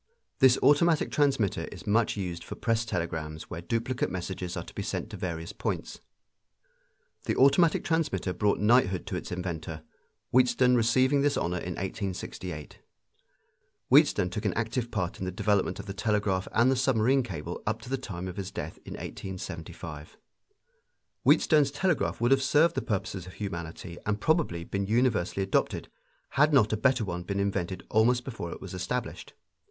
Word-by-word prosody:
This 130 -1 +6
automatic 155 +2 +4
transmitter 135 -9 +1
is - - -10
much 110 +1 +2
used 90 -3 -4
for - - -7
press 115 0 0
telegrams 80 -5 -4
where 85 - -5
duplicate 115 +6 -1
messages 90 -1 -4
are - - -3
to - - -13
be - - -4
sent - - -4
to - - -6
various 85 -2 -4
points. - - -4 1.3
The - - 0
automatic 140 +5 +4
transmitter 145 - 0
brought 100 +3 +1
knighthood 105 -4 +3
to - - -4
its - - -5
inventor, 80 -3 -4 0.5
Wheatstone 125 0 +4
receiving 130 +4 +3
this 145 0 +2
honor 90 +1 -1
in 90 - -4
1868. 95 -5 -5 1.1
Wheatstone 130 - +5
took 105 - -4
an - - 0
active 115 +1 -1
part 90 -6 -3
in 95 - -3
the 90 - -2
development 100 +2 +1
of 100 - -6
the 100 - -5
telegraph 105 -3 0
and 120 +3 +4
the - - +3
submarine 130 0 +3
cable 85 -7 -6
up 110 +1 0
to - - -9
the - - +2
time 95 -8 -6
of 90 - -7
his 95 -1 -4
death - - -6
in - - -8
1875. 85 -4 -7 1.1
Wheatstone's 150 -3 +5
telegraph 155 +3 0
would 120 +2 +2
have 135 0 +5
served 150 +5 +4
the - - -1
purposes 100 -5 -3
of 90 - -10
humanity 85 -3 -6
and 105 0 0
probably 155 - +1
have 85 - -12
been 100 0 -1
universally 110 -5 +1
adopted, 95 - 0 0.4
had 150 +3 +3
not 115 -7 +4
a - - +3
better 125 +1 +2
one 90 -2 -3
been 100 +3 -3
invented 95 -2 -2
almost 120 +3 +3
before 110 -10 -5
it - - -7
was 95 - -8
established. 90 -1 -4
105 Hz, 170 wpm, -28 LUFS, 90-125 Hz, 1.3 s, This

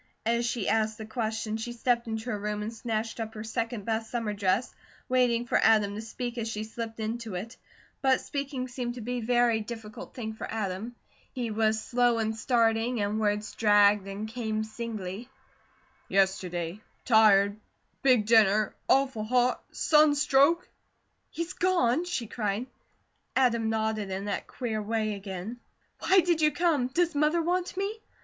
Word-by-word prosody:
As 235 +1 +1
she 235 -4 -2
asked 220 -1 +1
the 220 - -7
question, 220 -1 -2
she 240 +2 -5
stepped 240 0 0
into 220 +2 -3
her 210 - -2
room 210 0 -3
and 220 +2 -4
snatched 225 0 -3
up 220 -1 -5
her 215 - -5
second 225 -1 -3
best 225 0 -2
summer 230 -3 -2
dress, 200 +3 0 0.3
waiting 245 -2 +2
for - - +2
Adam 210 -2 +4
to 210 - -5
speak 240 +2 -5
as 225 - -2
she 215 -1 -3
slipped 225 +1 -6
into 220 -1 -4
it. 225 +7 -6 0.5
But 265 -1 +4
speaking 275 -3 -4
seemed 245 -1 -4
to 245 - -7
be 245 +3 -3
a - - -3
very 240 -1 +3
difficult 220 -1 -8
thing 220 -3 -4
for 220 - -7
Adam. 215 +2 -3 0.4
He 240 -3 -3
was 220 0 +1
slow 245 -1 +2
in 220 -1 0
starting 230 0 +1
and 205 +1 0
words 210 0 0
dragged 205 -2 +4
and 200 +2 -5
came 220 -1 -2
singly: 220 -1 -6 0.8
"Yesterday 185 -1 0 0.2
tired 210 -3 +5 0.4
big 250 -6 +4
dinner 215 -2 +4 0.2
awful 265 -5 +3
hot 250 +2 +1
sunstroke 300 +1 +4 0.3
" - - -46
"He's 335 -1 -4
gone?" 340 -4 +2
she 265 -9 -2
cried. 215 +1 -2 0.7
Adam 235 -4 +2
nodded 220 -2 -1
in 190 +1 -4
that 205 - -3
queer 225 -4 -3
way 215 0 -1
again. 200 +3 -6 0.4
"Why 380 0 +5
did 340 -2 +1
you 305 - +5
come? 320 -8 +1
Does 340 +5 +1
Mother 305 +3 +2
want 360 +2 -1
me?" 405 +3 -2
225 Hz, 165 wpm, -28 LUFS, 215-250 Hz, 0.8 s, tired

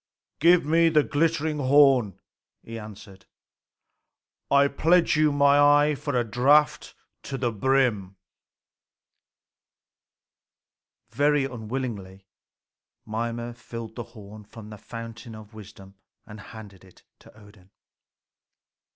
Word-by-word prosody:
"Give 170 0 +4
me 165 +2 +3
the 155 -2 +3
glittering 155 0 -1
horn," 130 -7 +3 0.5
he 115 0 -8
answered. 100 -2 -13 1.2
"I 140 0 +4
pledge 165 +5 +2
you 155 0 +2
my 140 0 +3
eye 145 +1 +4
for 145 0 -5
a - - 0
draught 140 +7 +1 0.3
to 135 - -6
the 120 -2 -2
brim." 110 -4 0 3.0
Very 145 +3 +1
unwillingly 110 -6 -7 0.8
Mimer 115 +2 -5
filled 115 -1 -10
the 120 - -6 0.2
horn 105 +1 -12
from 110 0 -13
the 105 - -11
fountain 115 0 -10
of 110 0 -14
wisdom 100 -2 -14 0.3
and 110 -1 -12
handed 105 -3 -13
it 95 -2 -21 0.2
to - - -20
Odin. 100 -3 -20
120 Hz, 110 wpm, -24 LUFS, 105-145 Hz, 3.0 s, Give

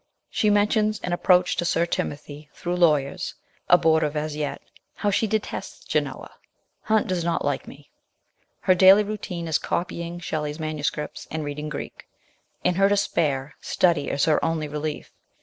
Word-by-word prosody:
She 215 - +2
mentions 210 +1 +2
an 180 - -2
ap 175 - -3
proach 180 -1 +4
to - - +1
Sir 170 0 +2
Timothy, 150 -2 -5
through 175 0 -3
lawyers, 150 -6 +1 0.3
abortive 160 -3 +4
as 150 0 -2
yet; 150 -1 -3 0.4
how 205 - 0
she 220 +3 +1
detests 215 0 -4
Genoa; - - -2 0.3
" - - -49
Hunt 220 0 +3
does 180 -2 -1
not 170 0 -1
like - - -1
me/' - - -13 0.7
Her 185 - +4
daily 190 +3 +7
routine 200 -5 -5
is 160 - +1
copying 170 0 -3
Shelley's 150 -2 -3
manu 155 -1 -3
scripts 150 +1 -3
and 155 -1 -3
reading 150 +1 -4
Greek; 150 - -7 0.6
in 180 - +3
her 195 - +6
despair, 155 -9 0
study 170 -5 +1
is 140 - +1
her 155 - +2
only 160 -2 0
relief. 150 +1 -4
170 Hz, 165 wpm, -24 LUFS, 150-185 Hz, 0.7 s, daily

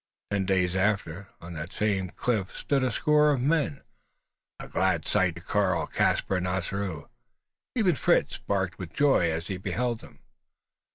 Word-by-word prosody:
Ten 100 -2 0
days 90 -2 +2
after, 95 -2 0
on 85 +1 -9
that 80 +1 -6
same 95 -3 0
cliff 105 -1 -2
stood 140 -2 0
a 130 - +2
score 150 +2 +3
of 140 -3 +2
men 145 +1 0 0.8
a - - -7
glad 95 -4 0
sight 95 -5 +2
to 85 - -9
Karl, 95 0 +1
Caspar, 95 - +1
and 90 0 -2
Ossaroo. 90 -2 -3 0.7
Even 205 -8 +3
Fritz - - +1
barked 95 -3 -2
with 90 -4 -7
joy 135 -12 +3
as 80 +1 -2
he 95 - -4
beheld 120 +5 -2
them! - - -16
95 Hz, 160 wpm, -27 LUFS, 90-125 Hz, 0.8 s, score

